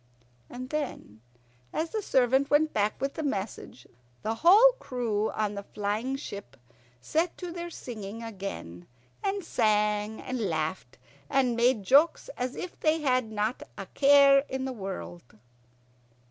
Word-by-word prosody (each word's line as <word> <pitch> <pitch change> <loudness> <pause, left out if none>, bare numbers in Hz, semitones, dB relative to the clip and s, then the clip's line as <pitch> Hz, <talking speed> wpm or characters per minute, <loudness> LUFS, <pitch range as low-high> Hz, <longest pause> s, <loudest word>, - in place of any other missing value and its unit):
And 255 +1 -8
then, 275 - -4 0.5
as 325 +1 -2
the 435 - -2
servant 265 - +2
went 310 +1 +3
back 210 0 0
with 275 +2 -2
the - - -4
message, 205 - -4 0.4
the 220 - 0
whole 415 +9 +8
crew 225 - -1
on 210 -1 -2
the 200 - -5
flying 210 +6 -3
ship 200 - -8 0.4
set 325 - -1
to 360 -2 -6
their 345 0 -5
singing 225 -7 -7
again, 190 - -7 0.4
and 400 -1 -1
sang 210 -3 +1
and 255 -1 -4
laughed 155 -4 -3 0.3
and 255 -3 +2
made 235 -2 +2
jokes 295 - +4
as 250 +1 -3
if 360 - -7
they 315 0 +2
had 255 -5 +1
not 215 +3 -1 0.2
a - - -5
care 280 0 +6
in 265 0 -3
the 265 - -3
world. 110 - -7
245 Hz, 145 wpm, -28 LUFS, 205-285 Hz, 0.5 s, whole